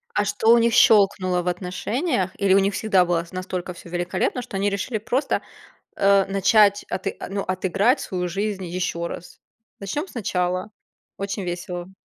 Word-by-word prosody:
А 205 - +2
что 205 +2 -2
у 235 - +7
них 230 -1 +3
щелкнуло 190 -5 +4
в 180 - -7
отношениях 190 - -1
или 195 -1 +3
у 195 - +6
них 195 +1 +1
всегда 190 -4 +2
было 170 -1 0
с 170 - -17
настолько 185 -1 -5
всё 170 - -13
великолепно, 175 +8 -1
что 195 - -6
они 200 +1 +1
решили 205 +4 -2
просто, 245 +6 -1 0.5
э, 195 -1 +4
начать 200 +1 +3
аты 190 - -3
э, - - -6
ну, 200 0 -2
отыграть 195 - +1
свою 180 -1 -3
жизнь 195 +1 -3
еще 170 -1 -3
раз? 175 - -9 0.4
Начнем 290 - -3
сначала. 185 - -2 0.5
Очень 200 0 -4
весело. 175 +1 -5
195 Hz, 170 wpm, -23 LUFS, 180-205 Hz, 0.5 s, у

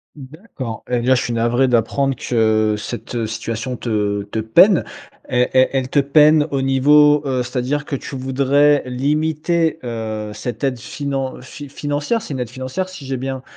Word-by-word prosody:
D'accord, 135 - -8
et 125 -1 +1
bien 130 +2 +3
je 125 - +2
suis 120 - -3
navré 120 +3 +2
d'apprendre 130 +3 +1
que 110 -3 +1
cette 110 +2 -5
situation 115 +3 -4
te 105 -3 -1
te 105 +2 -5
peine. 150 - +5 0.5
E 125 0 +3
e 130 0 +5
elle 130 -1 -1
te 145 - +2
peine 150 +2 +4
au 135 -1 0
niveau 145 +2 +5
heu, 130 -2 0
c'est-à-dire 130 +4 -2
que 145 - -3
tu 135 - -7
voudrais 140 +2 +2
limiter, 155 +5 0
heu, 110 -3 -4
cette 115 +3 -6
aide 130 -3 0
finan 135 0 -4
fi 145 +2 -10
financière? 145 - -2
C'est 150 - -6
une 130 - -4
aide 125 -2 -3
financière 130 +9 -4
si 185 -7 -10
j'ai 130 -1 -3
bien 130 0 -5
130 Hz, 170 wpm, -19 LUFS, 120-145 Hz, 0.5 s, peine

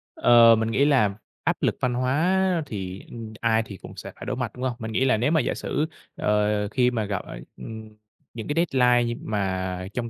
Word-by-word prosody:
Ờ, 115 -1 +7
mình 110 +1 -1
nghĩ 140 - +3
là 130 -9 +3 0.3
áp - - +1
lực - - +1
văn 125 -1 +1
hóa 170 +8 +1
thì, 95 -5 -6
ừm, 115 -2 -8
ai 115 -1 +2
thì 100 -3 -9
cũng - - -11
sẽ - - -7
phải - - -9
đối 130 +1 -2
mặt, 125 -3 -3
đúng 125 - -6
hông? 130 -1 0
Mình 110 0 -5
nghĩ 130 +4 +1
là 130 -4 +3
nếu 125 +8 +1
mà 160 - +4
giả - - -1
sử, 150 - -2 0.3
ờ, 105 0 +1
khi 125 +3 +2
mà 110 -3 -1
gặp, 100 -2 -2
ờ, - - -8 0.2
ừm, 110 -1 -8 0.4
những 115 -2 -6
cái 165 +4 +2
deadline 125 -2 +4
như 120 0 -2
mà 95 -3 -2
trong 120 -1 -3
115 Hz, 225 wpm, -25 LUFS, 105-130 Hz, 0.4 s, Ờ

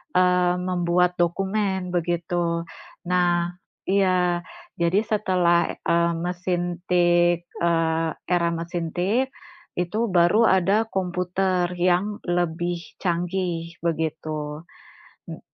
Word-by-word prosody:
eee, 180 -1 +3
membuat 180 0 +1
dokumen, 190 +1 0
begitu. 170 0 -1 0.4
Nah, 175 -1 +1 0.3
iya, 185 -3 +2 0.4
jadi 170 +4 +3
setelah, 185 -5 +1
eee, 170 0 +2
mesin 175 0 -2
tik, 175 -1 +3 0.2
eee, 165 -1 +1 0.2
era 175 -1 +2
mesin 165 0 -4
tik, 210 +9 +1 0.5
itu 180 +5 -1
baru 180 +6 +4
ada 195 +4 +3
komputer 180 -1 -1
yang 180 +4 +1
lebih 175 0 -1 0.3
canggih, 175 -1 -2
begitu. 155 -2 -3 0.7
M - - -7
175 Hz, 95 wpm, -24 LUFS, 170-185 Hz, 0.7 s, baru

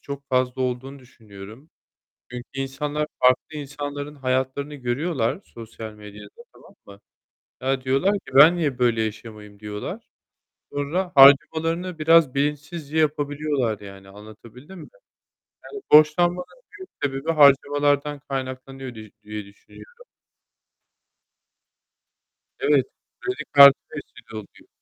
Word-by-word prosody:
çok 140 -1 -9
fazla 130 0 0
olduğunu 130 +2 -4
düşünüyorum. 110 +1 -14 0.6
Çünkü 125 0 -8
insanlar 145 +3 -3
farklı 130 +4 +2
insanların 145 0 -7
hayatlarını 130 +2 -2
görüyorlar, 130 +2 -2
sosyal 115 -1 -10
medyada 105 -1 -12 0.3
tamam 200 - -19
mı? 100 0 -15 0.6
Ya 135 0 0
diyorlar 135 +10 +1
ki 135 -8 -15
"Ben 150 +6 +7
niye 145 -7 -2
böyle 120 -2 +1
yaşamayayım?" 105 -1 -8
diyorlar. 105 -1 -7 0.6
Sonra 170 +6 -3
harcamalarını 160 +5 +4
biraz 160 -3 +4
bilinçsizce 150 +2 -3
yapabiliyorlar 145 -6 -1
yani 100 -1 -13
anlatabildim 110 - -14
mi? - - -12 0.8
Yani 415 - -9
borçlanmanın 175 +4 +4 0.3
büyük 375 - -11
sebebi 140 +3 -2
harcamalardan 145 0 +3
kaynaklanıyor 130 -2 -7
diye 110 -2 -12
diye 105 -1 -7
düşünüyorum. 480 - -17 2.6
Evet, - - +2 0.3
kredi 385 0 -4
kartı 140 -1 +9 0.2
vesile - - -11
oluyor. 105 - -14
135 Hz, 105 wpm, -23 LUFS, 120-150 Hz, 2.6 s, kartı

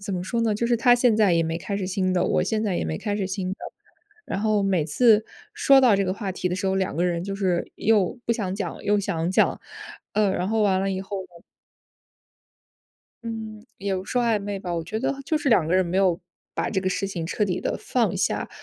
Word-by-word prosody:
怎 200 - -3
么 180 -1 -3
说 235 +5 -1
呢， 225 -2 +2
就 225 +3 -1
是 240 - +2
他 245 +1 +5
现 240 -3 +3
在 205 -5 +4
也 165 -1 +3
没 165 +1 -2
开 200 +4 -4
始 195 -2 -3
新 185 -1 0
的， 180 - +2
我 - - +2
现 215 +4 -1
在 190 -4 0
也 - - -1
没 80 0 -3
开 205 - -2
始 195 -3 -2
新 190 -1 -3
的。 - - -2 0.7
然 - - -3
后 215 -1 +2
每 185 -5 +1
次 215 +7 +4 0.3
说 275 -1 +5
到 245 -5 +5
这 195 - +1
个 185 - 0
话 195 -1 -4
题 180 - -2
的 180 - -2
时 195 +1 -2
候， 190 - +1
两 190 -5 -1
个 175 - +1
人 170 -1 0
就 195 +1 -4
是 185 -3 -1
又 210 -1 +2
不 235 - +3
想 205 -5 -2
讲， 200 - -5
又 205 0 +3
想 170 -3 -1
讲， 190 - +2 0.5
呃， 210 -1 +3
然 180 0 -1
后 220 0 +1
完 190 -2 +2
了 195 0 0
以 190 0 -2
后 195 0 -5
呢 - - -15 2.0
嗯， 220 -2 -6
也 195 -1 -2
不 185 - -4
说 245 +5 0
暧 225 -3 +2
昧 200 -1 -4
吧， 180 -2 -4
我 165 -1 -2
觉 215 +6 -4
得 275 - -1
就 310 - +1
是 295 - -3
两 200 -10 +4
个 175 - +2
人 185 0 +3
没 170 +2 -3
有 185 -3 +3 0.4
把 - - -1
这 190 - 0
个 185 - 0
事 195 +1 -1
情 175 -4 -4
彻 210 +5 0
底 180 -3 -2
地 - - -2
放 - - 0
下， - - -1
195 Hz, 270 characters per minute, -24 LUFS, 185-215 Hz, 2.0 s, 他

